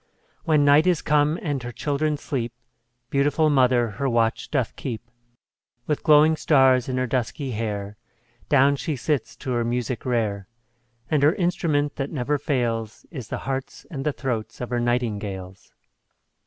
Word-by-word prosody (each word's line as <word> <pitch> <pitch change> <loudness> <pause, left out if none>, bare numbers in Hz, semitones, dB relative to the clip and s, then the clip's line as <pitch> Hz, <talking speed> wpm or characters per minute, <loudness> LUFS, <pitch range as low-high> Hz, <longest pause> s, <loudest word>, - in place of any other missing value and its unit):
When 155 -3 +3
night 145 +4 +5
is 175 -4 +2
come, 150 +2 +2
and 145 -4 -2
her 120 0 -6
children 150 +5 -1
sleep, 120 -6 -3 0.6
Beautiful 145 +3 +2
mother 125 -3 +3
her 135 +7 -2
watch 115 -2 0
doth 130 -6 -1
keep; 120 -5 -5 0.8
With 150 - -1
glowing 155 0 +6
stars 130 -5 +3
in 130 - -1
her 130 - +1
dusky 130 +2 -2
hair 105 -2 -4 0.5
Down 140 0 +5
she 155 +2 -2
sits 130 -3 -2
to 130 - -5
her 120 -1 +1
music 120 +1 -2
rare; 110 -6 -1 0.6
And 150 -3 +3
her 150 +6 +4
instrument 170 -6 0
that 135 0 -2
never 145 0 -1
fails, 115 -6 -2
Is 130 - -7
the - - -4
hearts 135 0 -4
and 135 -4 -4
the 150 - +1
throats 115 -5 -4
of 125 0 -5
her 120 - +1
nightingales. 105 -6 -3
130 Hz, 155 wpm, -24 LUFS, 120-145 Hz, 0.8 s, glowing